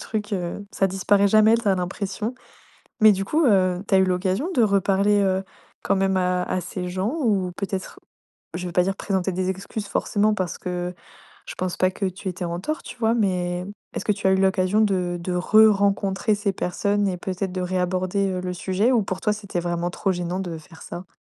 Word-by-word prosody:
truc, 215 -1 -4
heu, 180 +1 -3
ça 195 - +1
disparaît 195 +2 +2
jamais 215 +2 +5
tu 235 - -5
as 190 - +4
l'impression. 195 +5 -3 0.7
Mais 215 -1 +8
du 195 0 -2
coup, 315 +7 +2
heu, 185 -6 +3
tu 200 - +1
as - - +7
eu 190 - +5
l'occasion 185 - 0
de 240 - +4
reparler, 200 0 +3
heu, 190 -1 +1 0.4
quand - - +1
même 190 0 +1
à 180 -1 +1
à 185 - -1
ces 180 +1 -5
gens? 190 +8 -2
Ou 200 -8 +1
peut-être, 195 -1 -4 0.5
je 180 +1 -4
veux 175 - -5
pas 180 +1 +3
dire 195 +1 -1
présenter 190 -2 -1
des 185 +1 -1
excuses 195 +2 -5
forcément 210 +1 +1
parce 185 -4 -3
que 180 0 -4 0.5
je - - -5
pense 185 -1 -2
pas 185 - +2
que 195 +1 -3
tu 190 +1 -5
étais 180 0 -4
en 170 0 -3
tort, 310 +11 -3
tu 240 - -9
vois? 225 -1 +2
Mais 180 -4 0 0.3
est-ce - - -3
que 210 - +2
tu 200 0 -3
as - - +4
eu - - +4
l'occasion 190 +1 +2
de 185 -4 +1
de 180 +1 -3
re 215 +5 +6
rencontrer 200 +1 +1
ces 205 -1 -1
personnes 200 +2 0
et 185 - -2
peut-être 185 +1 -3
de 185 - -3
réaborder, 185 +2 0
heu, 185 -1 -2
le 180 0 -3
sujet? 190 +7 +1
Ou 235 -4 +3
pour 190 -1 -4
toi, 210 - +1
c'était 200 -3 -5
vraiment 175 0 -2
trop 190 +1 -1
gênant 175 +1 -3
de 175 -4 -4
faire 160 +1 -15
ça? 175 +1 -8
190 Hz, 220 wpm, -23 LUFS, 180-205 Hz, 0.7 s, Mais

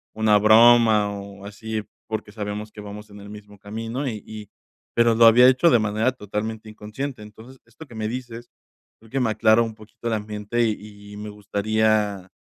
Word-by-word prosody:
una 110 -1 +3
broma 110 -1 +5
o 100 0 -9
así 110 +1 -5 0.2
porque 110 -1 -5
sabemos 105 0 -6
que 105 - -11
vamos 105 +1 -10
en 100 - -12
el 100 - -11
mismo 105 0 -12
camino 115 +6 -5
y 110 -5 -5
y 105 -2 -10 0.5
pero 115 -1 +4
lo 115 +1 +6
había 120 +3 +7
hecho 130 +6 +3
de 120 - +5
manera 110 +4 0
totalmente 110 -1 -5
inconsciente. 110 +4 -7
Entonces 115 +5 -14
esto 115 +7 -14
que 120 - -14
me 110 -1 -3
dices 120 0 -7 0.5
creo 115 - -19
que 135 - -1
me 115 - +1
aclara 110 +1 +4
un 115 -1 -5
poquito 110 +2 -10
el 115 - 0
ambiente 105 +2 -3
y 105 -1 -7
y - - -9
me 105 0 -7
gustaría 105 -1 -1
110 Hz, 190 wpm, -23 LUFS, 105-115 Hz, 0.5 s, había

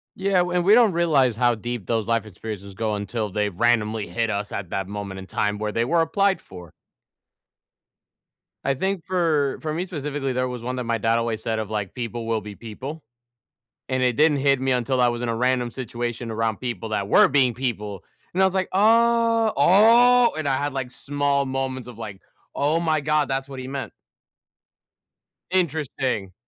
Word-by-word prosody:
Yeah, 190 -1 +1
and 180 0 +1
w 180 0 +1
we 210 - +7
don't 230 -6 +5
realize 145 -9 +3
how 120 0 +2
deep 120 -2 -5
those 115 -2 -1
life 115 -2 +1
experiences 100 -1 -8
go 110 +1 -2
until 105 +1 -3
they 105 +1 -1
randomly 110 +1 +1
hit 115 +6 -1
us 100 0 -3
at 95 -4 -5
that 95 -1 -2
moment 100 -2 -6
in 95 - -10
time 105 0 -1
where 105 -1 -2
they 115 +2 0
were 165 +4 +2
applied 195 +4 +1
for. 90 -4 -12 1.9
I 135 - +1
think 190 +4 -2
for 165 -7 +1
for 155 -1 -3
me 175 +3 -2
specifically, 145 -6 -3
there 130 0 0
was 125 -2 -6
one 125 +1 -3
that 125 - -2
my 115 0 0
dad 115 +2 +1
always 115 -2 -2
said 110 -1 -1
of, 110 -1 -4
like, 105 -3 -3
"People 120 -1 -5
will 110 -2 0
be 105 0 -9
people," 135 +7 -8 0.8
and 130 -1 0
it 125 -1 +3
didn't 150 -1 +4
hit 140 -1 +2
me 130 0 +1
until 125 +1 +1
I 125 - +5
was 120 0 -2
in 120 - -2
a 115 - -1
random 125 0 0
situation 120 -1 -4
around 110 -1 -1
people 115 -3 -5
that 100 -2 -2
were - - +6
being 130 -3 +3
people, 105 -6 -4 0.3
and 190 - +1
I - - +7
was 190 - +1
like, 190 -1 0
"Oh, 230 +1 +4
oh!" 235 - +6
And 155 -2 -2
I 135 - +2
had, 145 -1 -2
like, 130 -2 -4
small 140 0 0
moments 130 -1 -3
of, 120 -2 -10
like, 100 -4 -7 0.3
"Oh 150 +4 +1
my 160 -2 +1
god, 150 0 +1
that's 135 0 -2
what 135 -1 -7
he 130 - -6
meant." 135 0 -5 1.6
Interesting. 135 - -1
125 Hz, 195 wpm, -23 LUFS, 110-155 Hz, 1.9 s, we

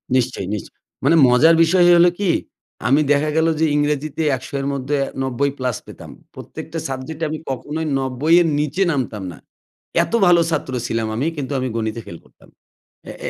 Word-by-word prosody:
নিশ্চয়ই, 125 -7 -1
নিশ 105 - -3 0.4
মানে 165 - +4
মজার 145 +7 +5
বিষয় 175 +2 +4
হল 170 - +6
কী? 195 -4 +2 0.6
আমি 140 +4 +4
দেখা 145 +1 +2
গেলো 165 +1 +3
যে 160 - +3
ইংরেজিতে 150 +1 -1 0.2
১০০ 120 - -12
এর 135 - -3
মধ্যে 140 +2 -2 0.3
৯০ 135 +2 -1
প্লাস 125 -4 -2
পেতাম, - - -12 0.2
প্রত্যেকটা 165 +1 -8
সাবজেক্টে 135 +5 -6
আমি 155 0 -4
কখনোই 150 +4 -4
৯০ 135 +5 +1
এর 170 - +2
নীচে 150 +6 0
নামতাম 120 -8 -3
না। - - -12 0.7
এত - - -8
ভালো 175 -1 +5
ছাত্র 130 - -2
ছিলাম 115 -1 -2
আমি, 130 +7 -1
কিন্তু 140 -1 -4
আমি 130 - -2
গণিতে 110 0 -3
ফেল 85 - -8
করতাম। - - -23 0.6
অ্যা - - -8
এ - - -1
140 Hz, 175 wpm, -20 LUFS, 125-160 Hz, 0.7 s, হল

